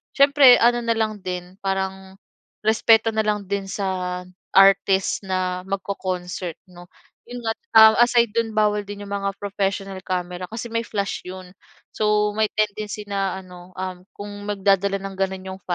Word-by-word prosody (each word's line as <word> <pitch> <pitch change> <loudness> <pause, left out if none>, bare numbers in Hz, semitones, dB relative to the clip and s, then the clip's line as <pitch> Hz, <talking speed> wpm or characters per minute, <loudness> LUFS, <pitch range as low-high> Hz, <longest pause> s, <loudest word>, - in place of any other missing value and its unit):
siyempre 275 -2 +7
ano 240 +1 +4
na 230 0 +1
lang 215 -1 -1
din 180 -1 -6
parang 190 0 -3 0.5
respeto 220 +1 +4
na 220 - +3
lang 210 -1 -1
din 200 0 -2
sa 185 -2 -3 0.4
artist 195 0 +4
na 185 -1 -1
magco-concert 185 -3 -4
'no, 175 0 -14 0.4
'yon 245 0 -7
nga. 225 - +1 0.3
Ah, 220 0 +9
aside 240 -2 +3
do'n, 230 -1 0
bawal 210 -1 +2
din 205 0 -8
'yong 200 - -11
mga 200 0 -1
professional 195 -1 -3
camera 180 -1 -3
kasi 225 +1 -6
may 230 0 0
flash 200 -3 -3
'yon. 185 0 -9 0.4
So, 210 -1 +1
may 215 0 +2
tendency 210 0 -2
na 195 -2 -2
ano, 180 -1 -13
um, 185 -1 -5 0.2
kung 205 0 -7 0.2
magdadala 195 -1 +1
ng 195 0 -6
gano'n 190 -1 -2
'yong 190 0 -8
195 Hz, 155 wpm, -22 LUFS, 185-215 Hz, 0.5 s, Ah